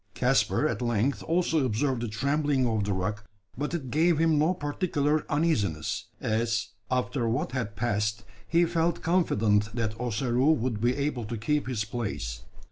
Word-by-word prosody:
Caspar - - +2
at 110 - -3
length 120 +3 0
also 165 -3 +1
observed 125 +1 0
the 120 - -2
trembling 140 +4 +1
of 110 -4 0
the 100 - -1
rock, 105 +3 -2 0.3
but 150 +6 -2
it 135 -7 -5
gave 165 +2 +3
him 160 -1 +3
no 155 +4 +3
particular 150 -1 0
uneasiness: 115 - 0
as, 110 0 0 0.2
after 125 -1 0
what 120 +2 -1
had 115 -5 -3
passed, 105 -1 -1 0.2
he 170 +1 +4
felt 170 0 0
confident 110 - +2
that 115 -3 -1
Ossaroo 125 +4 +2
would 120 -6 -2
be 120 +2 +2
able 140 -5 -2
to 115 +2 -4
keep 145 +7 0
his 115 -5 -1
place. 100 - -4
125 Hz, 160 wpm, -28 LUFS, 110-150 Hz, 0.3 s, he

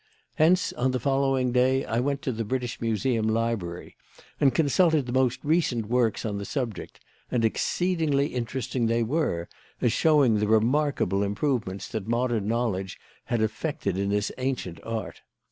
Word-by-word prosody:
Hence, 180 +4 +3
on 130 +2 0
the 130 - 0
following 135 -1 +1
day, 130 +2 +2
I 115 - -1
went 140 +2 -1
to 130 - -1
the 115 -1 -3
British 125 +2 -3
Museum 115 0 0
library 110 -6 -2 0.4
and 140 - +5
consulted 160 0 +3
the 120 - -5
most 130 -1 +2
recent 145 -8 +1
works 120 0 +1
on 105 -2 -2
the - - -4
subject; 115 - -4 0.3
and 120 -3 +1
exceedingly 160 +2 +1
interesting 125 0 -2
they 115 +1 +1
were, 110 - -1 0.3
as 115 - +2
showing 140 -9 +4
the 105 - +1
remarkable 110 -2 +2
improvements 100 -1 -1
that 110 -2 -4
modern 120 -3 0
knowledge 105 -5 -1 0.3
had 115 -2 0
effected 110 - -2
in 100 +1 -1
this 105 +1 0
ancient 125 -11 -3
art. 115 -3 -5
120 Hz, 155 wpm, -26 LUFS, 110-135 Hz, 0.4 s, and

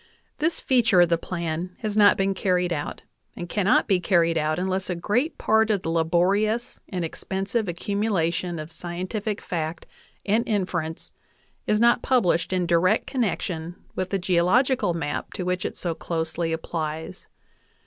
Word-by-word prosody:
This 320 +2 +1
feature 230 -8 +4
of 175 - +4
the 170 - +3
plan 170 +1 -4
has 215 -2 -2
not 205 -1 +6
been 195 0 +1
carried 180 -2 +1
out, 145 -3 -5 0.3
and 175 - -5
cannot 200 +2 +2
be 190 -2 +3
carried 170 -2 +2
out 155 0 0
unless 190 +1 -1
a 180 - -1
great 225 - 0
part 220 0 +3
of 205 -4 +1
the 165 - -1
laborious 195 +9 +1
and 180 -3 -2
expensive 195 +6 -2
accumula 190 -1 0
tion 175 0 -3
of 155 +1 -7
scientific 185 +6 -4
fact 160 -1 -4 0.4
and 215 +3 +2
inference 175 -6 -2 0.6
is 210 - +2
not 235 +1 +4
published 190 -10 +2
in 185 -1 +1
direct 175 +5 +3
connection 175 - -2 0.2
with 185 0 -2
the 195 - 0
geological 190 +4 +2
map 150 -3 -3
to 185 - -3
which 180 0 -1
it - - -4
so 175 -2 -2
closely 165 0 -2
ap 160 0 -3
plies. 160 +2 -5
180 Hz, 160 wpm, -25 LUFS, 170-205 Hz, 0.6 s, not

